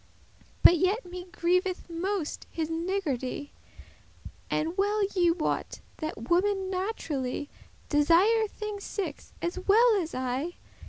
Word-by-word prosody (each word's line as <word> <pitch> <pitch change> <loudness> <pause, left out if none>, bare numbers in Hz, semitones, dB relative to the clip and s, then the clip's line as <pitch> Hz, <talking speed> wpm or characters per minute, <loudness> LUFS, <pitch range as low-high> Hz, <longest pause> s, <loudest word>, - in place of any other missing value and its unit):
But 345 - +8
yet 390 +6 +1
me 360 0 -7
grieveth 360 +1 0
most 345 0 -3
his 325 -1 -3
niggardy.* 325 -6 -2
*stinginess - - -19 0.2
And 320 +3 -1
well 410 +2 +2
ye 350 -2 +4
wot, 335 -1 -1 0.2
that 310 -8 -5
women 380 +3 +2
naturally 300 - -3 0.4
Desire 355 +10 +4
thinges 420 -1 -6
six, 400 -3 -5
as 345 +2 -2
well 435 +4 +5
as 325 - -5
I. 260 +6 -2
355 Hz, 120 wpm, -28 LUFS, 315-395 Hz, 0.4 s, But